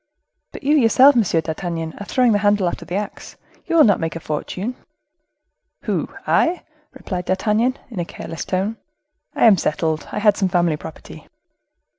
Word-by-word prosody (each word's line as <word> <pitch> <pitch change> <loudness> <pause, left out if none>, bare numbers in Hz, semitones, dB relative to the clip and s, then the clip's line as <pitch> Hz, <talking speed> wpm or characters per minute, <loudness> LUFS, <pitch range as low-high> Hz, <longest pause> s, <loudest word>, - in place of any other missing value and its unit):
"But - - -10
you 290 +3 +3
yourself, 265 +1 +6
M. 235 - +5
d'Artagnan, 165 -2 -2
are 205 - -7
throwing 250 -3 +3
the 205 - +2
handle 205 -2 +2
after - - -4
the 175 - -5
axe; 205 +1 -5 0.3
you - - -1
will 320 - +7
not 205 -6 +4
make 165 -1 -3
a - - -4
fortune." 185 +9 -4 1.1
"Who? - - -2 0.2
I?" 345 +2 +2 0.3
replied 180 -2 -5
D'Artagnan, 215 +7 +1
in 210 - -5
a 175 - -1
careless 165 - -7
tone; 195 +4 -2 0.6
"I - - +3
am 215 -4 +7
settled—I 160 +3 -2
had 210 -1 +3
some 190 -2 +1
family 175 -3 +2
property." 150 - -11
195 Hz, 165 wpm, -20 LUFS, 170-225 Hz, 1.1 s, will